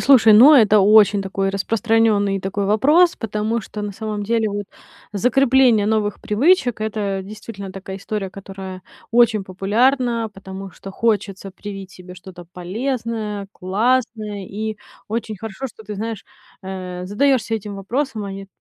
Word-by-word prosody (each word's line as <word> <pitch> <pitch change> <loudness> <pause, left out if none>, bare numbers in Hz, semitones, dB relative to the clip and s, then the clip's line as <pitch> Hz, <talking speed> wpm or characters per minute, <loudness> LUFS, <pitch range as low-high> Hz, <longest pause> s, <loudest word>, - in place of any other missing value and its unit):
слушай, 240 -5 +6
ну, 255 +9 +9
это 215 -5 +6
очень 205 0 +5
такой 195 0 -2
распространённый 205 -1 +1
такой 195 +1 -2
вопрос, 300 - +4
потому 220 +1 -2
что, 210 -1 -7
на 205 -1 -4
самом 215 0 -4
деле, 225 +1 0
вот 205 0 -4 0.5
закрепление 250 -1 +3
новых 210 -1 0
привычек- 245 - +2
это 205 -3 -2
действительно 200 -1 -9
такая 190 0 -7
история, 200 -1 -4
которая 190 -1 -9 0.3
очень 225 -3 +3
популярна, 230 +5 +1
потому 195 0 -9
что 195 - -10
хочется 200 -3 -1
привить 195 -1 -8
себе 180 0 -12
что-то 180 -1 -12
полезное, 215 +1 -3
классное. 215 0 -1
И 215 +2 -4 0.3
очень 220 -1 -3
хорошо, 225 +6 -6
что 225 - -13
ты, 210 - -6
знаешь, 220 0 -5 0.4
э, 185 -1 -6
задаешься 230 +2 +1
этим 210 -2 -5
вопросом, 225 +2 -3
а 195 - -5
не 195 0 -8
210 Hz, 140 wpm, -20 LUFS, 195-230 Hz, 0.5 s, ну